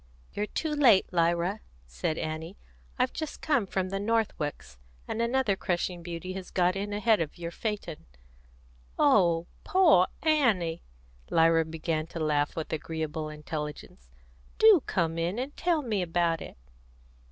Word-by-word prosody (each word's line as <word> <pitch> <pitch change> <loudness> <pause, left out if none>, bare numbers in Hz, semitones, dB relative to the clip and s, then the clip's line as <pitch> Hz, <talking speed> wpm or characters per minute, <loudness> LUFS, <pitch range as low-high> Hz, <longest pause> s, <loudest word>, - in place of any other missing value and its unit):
"You're 210 +1 -2
too 315 +7 -3
late, 245 -12 +4
Lyra," 170 +4 +1 0.3
said 60 - -3
Annie. 160 +4 -5 0.4
"I've 255 0 +1
just 315 -2 -5
come 280 -10 +1
from 185 0 -2
the 195 +1 -2
Northwicks, 195 - -2 0.3
and 230 - -2
another 235 -3 +1
crushing 175 -1 -2
beauty 170 +2 -6
has 190 -1 -7
got 180 0 +2
in 200 +1 -3
ahead 210 -1 +2
of 160 +1 -4
your 170 -1 -5
phaeton." 200 - -5 0.9
"Oh, 175 - +4 0.2
poor 325 - +5 0.2
Annie!" 220 - +2 0.5
Lyra 165 0 +4
began 160 0 -3
to 165 - -7
laugh 150 -2 0
with 160 -1 -4
agreeable 160 0 -3
intelligence. 150 - -7 0.5
"Do 435 -7 +7
come 165 -3 0
in 175 +5 -1
and 265 +4 -4
tell 335 -3 +1
me 215 -6 -1
about 170 -1 0
it!" - - -9
175 Hz, 140 wpm, -28 LUFS, 165-220 Hz, 0.9 s, Do